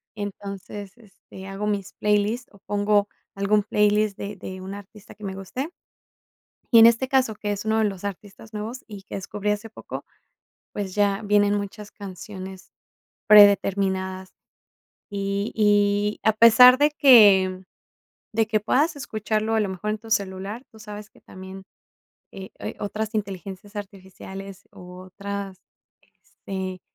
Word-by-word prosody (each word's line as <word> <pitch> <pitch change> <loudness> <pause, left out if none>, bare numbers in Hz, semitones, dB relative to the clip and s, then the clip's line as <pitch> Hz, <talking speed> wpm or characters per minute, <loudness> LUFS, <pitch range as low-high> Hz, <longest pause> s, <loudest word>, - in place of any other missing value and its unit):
entonces, 200 0 -7
este, 195 -3 -14
hago 195 +2 -4
mis 200 -2 -2
playlist, 210 +4 0
o 200 - -19
pongo 205 +1 +1 0.3
algún 200 +1 +2
playlist 210 -1 +2
de 200 0 -6
de 185 0 -8
un 190 +1 -7
artista 205 +1 -12
que 210 - -16
me 190 -1 -4
guste. 250 - -5 1.0
Y - - +9
en 225 - +10
este 235 +3 +4
caso, 260 -4 +2
que 205 -1 -3
es 205 +1 -4
uno 220 0 +1
de 220 - +3
los 195 -2 -4
artistas 205 +2 -8
nuevos 220 +4 -6
y 205 -3 -9
que - - -8
descubrí 205 +2 -4
hace 210 +2 -4
poco, - - -8 0.7
pues, 195 -2 -4
ya 200 0 +2
vienen 205 0 +3
muchas 205 +1 -6
canciones 190 -1 -9 0.6
predeterminadas. 195 -2 +4 0.8
Y 200 +1 -2
y 205 -1 +2
a 220 - +4
pesar 250 +3 +8
de 295 +2 +3
que 200 -10 +6 0.7
de 220 0 +1
que 215 -1 +1
puedas 295 +9 +1
escucharlo 220 -4 -2
a 220 - +3
lo 205 -2 0
mejor 200 +3 -3
en 215 - -3
tu 225 0 -13
celular, 200 +3 -2
tú 220 - -16
sabes 210 0 -9
que - - -23
también, 190 0 -11 0.7
eh 190 0 -9
eh, - - -5
otras 215 +2 -4
inteligencias 195 0 -5
artificiales 195 0 -9
o 180 -2 -12
otras, 200 0 -6 0.5
este, 190 -1 -8
205 Hz, 145 wpm, -24 LUFS, 195-215 Hz, 1.0 s, en